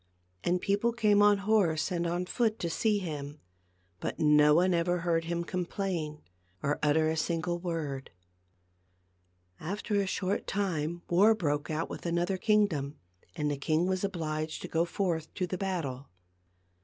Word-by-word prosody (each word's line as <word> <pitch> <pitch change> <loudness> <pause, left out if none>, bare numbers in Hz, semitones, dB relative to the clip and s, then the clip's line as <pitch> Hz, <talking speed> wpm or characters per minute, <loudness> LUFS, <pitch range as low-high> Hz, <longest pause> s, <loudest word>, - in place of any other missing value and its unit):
And 180 +1 +1
people 205 +5 +1
came 210 -3 +3
on 205 0 +6
horse 195 -6 +1
and 170 -1 0
on 175 +2 -1
foot 220 +3 0
to 170 - -3
see 215 +4 +2
him, 150 -5 -5 0.6
but - - -4
no 150 -1 +5
one 180 +2 +4
ever 175 +1 +1
heard 165 -1 +1
him 170 0 -2
complain 175 -3 -3 0.4
or 145 +1 0
utter 150 +1 +3
a 160 - 0
sin 165 +1 0
gle 175 +1 -2
word. 160 -6 -4 1.5
After 200 +4 -1
a 195 - -2
short 190 +1 -1
time 175 -4 -2
war 205 +6 +5
broke 145 -7 -1
out 155 +1 -1
with - - -6
another 175 +3 0
kingdom, 180 -11 +1 0.4
and 150 -3 -1
the 145 - -2
king 155 +4 +1
was 185 0 -1
obliged 155 -5 -3
to - - -4
go 165 +1 +1
forth 170 -4 -2
to 185 - 0
the 180 0 -4
battle. 155 -9 -3
170 Hz, 160 wpm, -30 LUFS, 155-195 Hz, 1.5 s, on